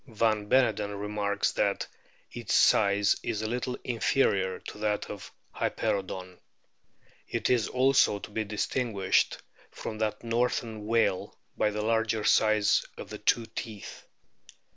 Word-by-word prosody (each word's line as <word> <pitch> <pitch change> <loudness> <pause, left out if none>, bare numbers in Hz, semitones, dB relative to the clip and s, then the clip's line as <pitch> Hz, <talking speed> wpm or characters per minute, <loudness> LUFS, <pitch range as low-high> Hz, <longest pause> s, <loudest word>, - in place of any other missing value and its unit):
Van 110 -3 0
Beneden 105 -6 +2
remarks 100 0 -1
that - - 0
o - - -30 0.4
its - - -2
size 100 0 +4
is 110 -2 -3
a - - -1
little 125 +2 -3
inferior 100 -6 +1
to - - -10
that 105 -1 -1
of 100 - -9 0.2
Hyperoodon. 95 -2 -2 0.9
It - - -1
is 120 -4 +2
also 130 -4 +3
to 100 +2 -10
be 110 +1 -1
distinguished 105 -1 0 0.3
from 110 - -7
that 110 0 -2
northern 115 -2 -1
whale 115 -5 +1 0.2
by 105 - +2
the 105 0 -3
larger 110 -1 +1
size 110 -1 +3
of - - -9
the - - -6
two 115 - +2
teeth. 110 -2 -8
110 Hz, 135 wpm, -28 LUFS, 100-115 Hz, 0.9 s, size